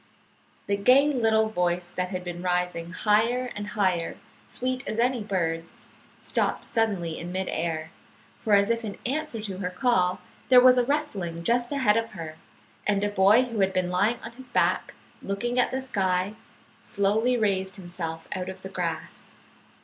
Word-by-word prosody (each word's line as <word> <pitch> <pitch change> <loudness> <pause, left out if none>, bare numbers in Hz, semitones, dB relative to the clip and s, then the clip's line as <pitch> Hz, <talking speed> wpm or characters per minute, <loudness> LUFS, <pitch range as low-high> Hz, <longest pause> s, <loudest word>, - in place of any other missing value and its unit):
The 200 - 0
gay 260 +8 +5
little 220 -3 +3
voice 175 -3 -1
that 180 0 -2
had 185 -1 -4
been 175 -1 -6
rising 180 -1 -1
higher 230 +6 +2
and 205 0 -5
higher, 185 -5 0 0.3
sweet 255 0 -2
as 215 - -3
any 245 0 +2
bird's, 165 -5 -3 0.3
stopped - - -1
suddenly 195 -8 -1
in 175 +1 -6
mid 190 +1 -2
air; 160 -1 -2 0.5
for, 210 -2 +3
as 200 +2 +3
if 230 0 -1
in 205 -3 -5
answer 285 -2 -2
to 195 -3 -5
her 180 -2 -2
call, 185 -2 +1 0.3
there 255 -1 +9
was 250 0 +7
a 245 - +2
rustling 200 - -2
just 240 +5 +1
ahead 255 -7 +3
of 230 0 -2
her, 160 -4 -7 0.5
and 205 -1 +2
a 205 - +1
boy 205 +4 +5
who 230 -4 -4
had 190 -1 +2
been 185 -1 0
lying 205 +6 +2
on 230 - -7
his 255 +2 -13
back, - - +1 0.3
looking 240 +5 -1
at 250 - +3
the 260 - -2
sky, 190 -6 0 0.5
slowly 220 +4 +1
raised 190 -3 0
himself 175 -4 -6
out 185 0 -3
of 190 0 -9
the 190 - -6
grass. 175 -4 -4
200 Hz, 170 wpm, -26 LUFS, 180-235 Hz, 0.5 s, there